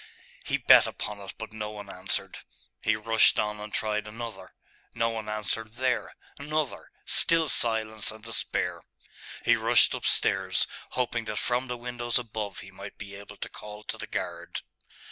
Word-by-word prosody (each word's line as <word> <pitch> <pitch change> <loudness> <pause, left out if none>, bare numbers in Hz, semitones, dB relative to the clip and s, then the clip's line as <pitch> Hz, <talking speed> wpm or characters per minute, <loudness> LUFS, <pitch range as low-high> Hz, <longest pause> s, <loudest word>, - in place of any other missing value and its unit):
He - - 0
beat - - +8
upon 105 -1 -5
it 100 -1 -8
but 110 -1 -7
no 105 -1 -3
one 105 -1 -8
answered. - - -2 0.4
He 110 - +3
rushed 115 +1 +5
on 105 0 0
and 105 0 -7
tried 105 -1 -1
another. 115 +1 -7 0.4
No 115 0 +2
one 110 -1 -4
answered 110 +1 -2
there. 125 0 0 0.2
Another 150 0 -2 0.2
still 165 -1 +4
silence 110 -4 +2
and 110 0 -7
despair!.... 115 -2 -1 0.6
He - - +6
rushed - - +5
upstairs, - - +2 0.3
hoping 120 -2 0
that 110 -1 -3
from 125 +1 +1
the 125 -1 -3
windows 120 -1 -1
above 110 -4 -4
he 95 - -11
might 100 +1 -9
be 100 -1 -8
able 100 +1 -10
to - - -5
call 105 0 -10
to - - -4
the - - -5
guard. - - -4
110 Hz, 165 wpm, -28 LUFS, 105-120 Hz, 0.6 s, beat